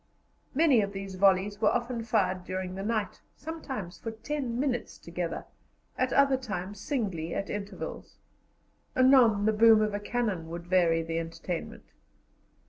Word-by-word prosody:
Many 290 -6 +5
of 200 0 -3
these 195 0 -6
volleys 195 +2 +3
were - - +5
often 240 0 -1
fired 185 -5 +1
during 185 0 -4
the 190 - -5
night, 215 0 -2
sometimes 265 - -6
for 225 - -5
ten 240 +2 -3
minutes 255 -4 -2
together, 170 0 -4 0.5
at 255 0 0
other 275 -1 +4
times 205 -5 -5
singly, 190 - -2
at 195 - -3
intervals; 205 0 -6 0.8
anon 255 -6 +5
the 220 - +3
boom 225 0 +7
of 215 -1 +1
a 205 - -1
cannon 205 -7 -2
would 170 +1 -6
vary 170 -2 +3
the 165 0 -2
entertainment. 165 +1 -6
205 Hz, 145 wpm, -29 LUFS, 185-240 Hz, 0.8 s, boom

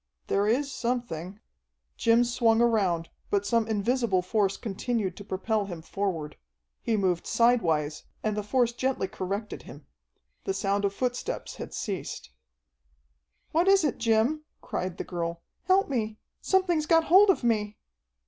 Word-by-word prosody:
"There 200 +1 +1
is 275 +6 +1
something 235 -8 -3 0.3
" - - -52
Jim 230 +1 +4
swung 235 -2 +2
around, 195 -8 +2 0.2
but 200 0 +1
some 230 0 +2
invisible 220 -2 +1
force 195 0 +1
continued 210 -3 -2
to 205 - -8
propel 205 +2 -1
him 170 -4 -7
forward. 175 -6 -3 0.4
He 225 -2 0
moved 185 -4 0
sidewise, 165 -11 +2 0.2
and 215 -1 0
the 210 - -1
force 240 +3 +1
gently 255 -4 -1
corrected 195 +3 -4
him. - - -12 0.6
The 390 - -2
sound 200 0 0
of 200 - 0
footsteps 250 - -3
had - - -7
ceased. 195 - -5 1.2
"What 335 +4 +2
is 390 -2 +6
it, 290 -6 0
Jim?" 230 +7 +2 0.2
cried 185 0 -4
the - - -3
girl. 170 -1 -4 0.2
"Help 375 +2 +4
me! 220 -5 -2 0.2
Something's 350 -5 +2
got 330 -1 +5
hold 385 +5 +6
of 375 - +3
me!" 215 -3 0
220 Hz, 150 wpm, -27 LUFS, 190-245 Hz, 1.2 s, is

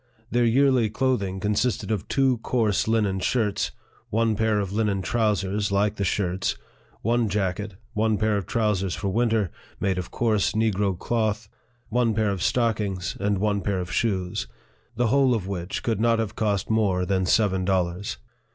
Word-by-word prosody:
Their 120 0 +3
yearly 125 -1 +3
clothing 105 -5 0
consisted 105 +3 0
of 105 -4 -2
two 130 -3 +2
coarse 110 -4 +1
linen 105 -4 +1
shirts, 105 0 0 0.4
one 115 0 +1
pair 110 0 +1
of 100 -1 -3
linen 105 -3 0
trousers, 105 -3 0
like 100 +1 +1
the 100 - -1
shirts, 95 0 0 0.5
one 115 0 +2
jacket, 100 0 -2 0.2
one 110 0 +1
pair 110 +1 +1
of 100 -4 -2
trousers 105 -5 0
for 100 - -2
winter, 110 -3 +1 0.3
made 95 -2 0
of 90 - -5
coarse 105 -3 +1
negro 105 -4 +1
cloth, 110 0 -1 0.4
one 115 -1 +1
pair 110 -2 +1
of 95 -3 -3
stockings, 105 -7 0
and 100 +1 +1
one 100 0 0
pair 100 -2 -1
of 90 0 -5
shoes; 95 - -1 0.5
the 120 -2 +1
whole 135 -1 +4
of 105 -5 -3
which 90 -1 -4
could 110 -3 0
not 115 0 +3
have 110 -3 -2
cost 105 -2 0
more 100 -5 +2
than 95 -1 0
seven 95 -3 +2
dollars. 90 0 -1
105 Hz, 165 wpm, -25 LUFS, 95-115 Hz, 0.5 s, whole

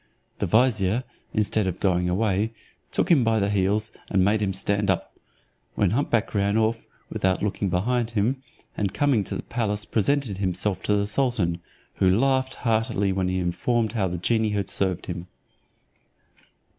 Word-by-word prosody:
The - - 0
vizier. 110 -1 +2 0.3
instead 105 -1 +1
of 90 - -3
going 90 -2 +1
away, 105 +3 0 0.4
took 180 - +1
him 145 -7 +5
by 115 -1 +2
the 100 0 0
heels, 105 +2 +1 0.2
and 95 -2 +3
made 105 +2 +2
him 100 -2 +1
stand 100 +2 0
up, - - -1 0.6
when - - +2
hump 140 +6 0
back 115 -3 0
ran 100 0 +1
off, 110 +1 0 0.2
without 95 0 0
looking 100 -1 -1
behind 115 +6 0
him; 115 +4 0 0.3
and 100 -2 -2
coming 140 -8 +2
to - - -4
the - - -4
palace 105 -3 -1
presented 115 -2 0
himself 95 +1 -1
to 105 - +2
the 100 0 +1
sultan, 105 -7 0 0.4
who 95 - +3
laughed 130 +1 +1
heartily 110 -4 0
when 95 -1 0
informed 95 +6 0
how 105 -5 0
the 90 0 -3
genie 110 +5 +1
had 100 -3 -2
served 95 -3 0
him. 90 0 -6
105 Hz, 165 wpm, -25 LUFS, 95-115 Hz, 0.6 s, him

